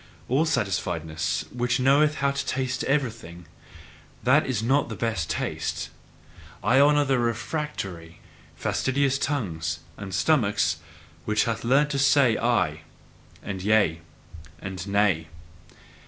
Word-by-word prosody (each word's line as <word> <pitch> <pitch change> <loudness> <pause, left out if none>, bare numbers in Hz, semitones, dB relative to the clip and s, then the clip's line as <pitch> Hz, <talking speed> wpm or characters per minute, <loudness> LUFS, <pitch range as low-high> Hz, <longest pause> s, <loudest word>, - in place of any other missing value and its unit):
All 135 +6 +2
satisfiedness, 85 - -1
which 125 +1 0
knoweth 145 +4 +4
how 140 -1 +1
to 140 - -2
taste 130 0 -1
everything, 115 - -2 0.8
that 140 +5 +4
is 120 -5 -1
not 135 +4 +2
the 110 - -5
best 105 -10 -2
taste! 80 - -3 0.7
I 130 +3 +4
honour 145 +1 +5
the 135 -2 +2
refractory, 115 - -4 0.4
fastidious 135 0 0
tongues 85 - -2 0.2
and 100 -1 -7
stomachs, 100 - +2 0.5
which 105 -1 +2
have 115 -1 -2
learned 140 +5 +3
to 140 - -1
say 135 -4 +4
"I" 90 -11 +1 0.6
and 95 -2 -5
"Yea" 100 -5 +2 0.6
and 95 -1 -6
"Nay." 100 -6 +2
115 Hz, 120 wpm, -25 LUFS, 95-140 Hz, 0.8 s, honour